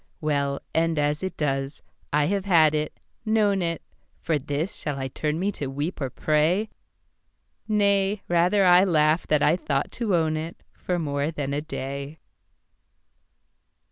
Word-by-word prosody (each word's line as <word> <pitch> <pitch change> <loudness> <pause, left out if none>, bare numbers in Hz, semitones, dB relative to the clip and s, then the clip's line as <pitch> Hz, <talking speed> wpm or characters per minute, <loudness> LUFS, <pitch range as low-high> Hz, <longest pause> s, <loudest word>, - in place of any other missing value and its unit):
Well, 140 -2 -1
end 165 0 +1
as 150 0 0
it 190 0 -4
does, 135 -1 -2 0.3
I 150 0 +3
have 195 +3 -1
had 160 -5 +5
it, 150 0 -2 0.2
known 215 -3 +2
it, 165 -1 -2 0.4
For 160 -3 0
this 145 +6 -3
shall 145 -2 -4
I 135 -1 -3
turn 150 +4 -2
me 200 +3 0
to 145 -8 -5
weep 145 +6 -4
or 135 - -1
pray? 160 - +1 1.0
Nay, 200 -1 +2
rather 180 +3 +3
I 180 +1 +7
laugh 160 -3 +2
that 150 -1 +2
I 155 - +4
thought 145 -5 -2
to 220 -6 0
own 160 -2 +1
itFor 165 +2 -5
more 145 -2 -1
than 145 -3 -3
a 145 - -1
day. 140 -1 -6
155 Hz, 150 wpm, -25 LUFS, 145-185 Hz, 1.0 s, I